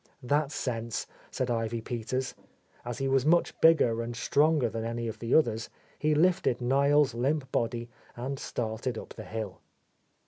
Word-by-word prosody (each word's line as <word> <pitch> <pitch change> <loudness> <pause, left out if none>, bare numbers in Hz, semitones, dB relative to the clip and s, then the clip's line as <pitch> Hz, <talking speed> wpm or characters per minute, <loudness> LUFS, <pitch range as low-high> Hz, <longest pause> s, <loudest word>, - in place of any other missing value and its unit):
"That's 145 +3 +1
sense," 115 -3 -2 0.2
said 130 -1 -2
Ivy 115 0 -1
Peters. 125 +3 -3 0.5
As 120 -1 -5
he 135 - -1
was 135 -1 +3
much 170 +4 +2
bigger 135 -8 +5
and 115 0 -4
stronger 145 +2 +3
than 115 0 -4
any 115 0 -3
of 110 - -5
the 115 +1 +1
others, 115 -7 +2 0.3
he 155 0 +2
lifted 170 -6 +3
Niel's 140 +2 +3
limp 135 +3 -1
body 115 0 -1 0.3
and 130 +3 -4
started 115 +1 -3
up - - -8
the - - -9
hill. 110 -4 -5
125 Hz, 160 wpm, -29 LUFS, 115-140 Hz, 0.5 s, bigger